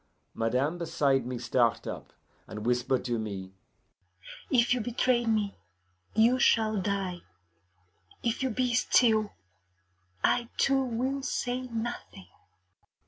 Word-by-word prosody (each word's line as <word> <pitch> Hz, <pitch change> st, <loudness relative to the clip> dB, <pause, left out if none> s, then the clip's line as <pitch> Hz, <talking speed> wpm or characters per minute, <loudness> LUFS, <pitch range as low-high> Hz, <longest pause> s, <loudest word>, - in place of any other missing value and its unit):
Madame 130 Hz, +9 st, 0 dB
beside 135 Hz, -6 st, +1 dB
me 125 Hz, -1 st, -3 dB
start 120 Hz, 0 st, +1 dB
up, -, -, -7 dB, 0.4 s
and 105 Hz, 0 st, -7 dB
whisper 125 Hz, +2 st, +1 dB
to 120 Hz, -2 st, -3 dB
me, 100 Hz, -3 st, -5 dB, 1.0 s
'If 240 Hz, -1 st, +4 dB
you 250 Hz, -, 0 dB
betray 240 Hz, +1 st, +1 dB
me, 215 Hz, -3 st, +1 dB, 0.6 s
you 235 Hz, +4 st, +4 dB
shall 220 Hz, -5 st, +3 dB
die. 190 Hz, -2 st, -2 dB, 1.0 s
If 230 Hz, -1 st, -1 dB
you 265 Hz, -, +1 dB
be 250 Hz, +1 st, 0 dB
still, 220 Hz, -3 st, +3 dB, 0.9 s
I 235 Hz, -1 st, +2 dB
too 270 Hz, 0 st, +3 dB
will 260 Hz, +3 st, -2 dB
say 255 Hz, -1 st, -2 dB
nothing. 235 Hz, 0 st, -5 dB
215 Hz, 115 wpm, -29 LUFS, -, 1.0 s, If